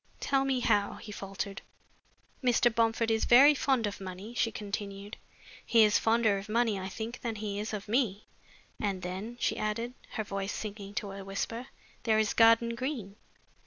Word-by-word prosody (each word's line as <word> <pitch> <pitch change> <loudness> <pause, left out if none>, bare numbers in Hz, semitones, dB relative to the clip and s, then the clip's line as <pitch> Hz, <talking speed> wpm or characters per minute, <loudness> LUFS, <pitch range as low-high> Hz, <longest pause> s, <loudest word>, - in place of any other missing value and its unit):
"Tell 270 -1 +1
me 265 -2 0
how?" 205 -3 +2
he 210 - -10
faltered. 195 0 -5 0.8
"Mr. 240 -1 +3
Bomford 225 0 +2
is 220 - +1
very 275 +5 +8
fond 265 -4 +1
of 205 -1 -4
money," 190 +4 -7
she 230 -1 +1
continued. 200 0 -6 0.5
"He 230 -2 +5
is 210 -1 +4
fonder 225 -3 +3
of 200 +2 -10
money, 225 -2 +1
I 190 0 -5
think, 230 +5 -6
than 230 -2 -3
he 205 -1 -4
is 210 - -3
of 210 -2 -5
me. 215 -3 0 0.5
And 195 -3 -2
then," 195 +7 -5
she - - 0
added, 230 +3 -2 0.2
her 220 - -2
voice 195 0 -3
sinking 205 -1 -6
to 200 -2 -3
a 195 0 -7
whisper, 225 +5 -4 0.3
"there 220 -2 +2
is 215 -1 +2
Garden 230 +1 +5
Green. 235 -5 -4
215 Hz, 175 wpm, -30 LUFS, 200-235 Hz, 0.8 s, very